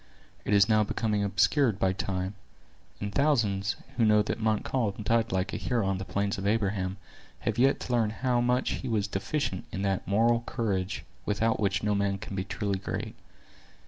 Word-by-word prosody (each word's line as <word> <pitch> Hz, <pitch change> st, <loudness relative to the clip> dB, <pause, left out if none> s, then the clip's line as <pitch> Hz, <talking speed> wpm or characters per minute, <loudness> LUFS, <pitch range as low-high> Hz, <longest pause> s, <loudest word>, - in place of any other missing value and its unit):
It -, -, 0 dB
is 100 Hz, 0 st, +6 dB
now 110 Hz, -1 st, +4 dB
becoming 105 Hz, 0 st, 0 dB
obscured 105 Hz, +4 st, +2 dB
by 95 Hz, 0 st, +2 dB
time; 95 Hz, 0 st, -2 dB, 0.7 s
and 100 Hz, 0 st, -4 dB
thousands, 105 Hz, -9 st, +2 dB, 0.2 s
who 120 Hz, -, +3 dB
know 105 Hz, -1 st, +5 dB
that 105 Hz, -, -3 dB
Montcalm 110 Hz, -1 st, 0 dB
died 115 Hz, +2 st, +1 dB
like 95 Hz, +2 st, -1 dB
a -, -, -1 dB
hero 120 Hz, -5 st, 0 dB
on 95 Hz, -1 st, 0 dB
the 95 Hz, -, -5 dB
plains 100 Hz, +1 st, -1 dB
of 100 Hz, -, -2 dB
Abraham, 100 Hz, -3 st, 0 dB, 0.4 s
have -, -, -1 dB
yet 135 Hz, +2 st, +4 dB
to 125 Hz, -, -3 dB
learn 115 Hz, -3 st, +3 dB
how 120 Hz, +2 st, 0 dB
much 125 Hz, +1 st, +1 dB
he 130 Hz, -, -4 dB
was 110 Hz, -4 st, 0 dB
deficient 100 Hz, -, -2 dB
in 95 Hz, -, -3 dB
that 95 Hz, -2 st, -1 dB
moral 115 Hz, +4 st, +3 dB
courage 95 Hz, -5 st, -2 dB, 0.2 s
without 110 Hz, +2 st, +1 dB
which 100 Hz, -2 st, 0 dB
no 105 Hz, 0 st, +2 dB
man 100 Hz, -1 st, +1 dB
can 100 Hz, 0 st, -7 dB
be 95 Hz, -, -1 dB
truly 100 Hz, 0 st, -2 dB
great. -, -, -4 dB
105 Hz, 185 wpm, -28 LUFS, 100-115 Hz, 0.7 s, is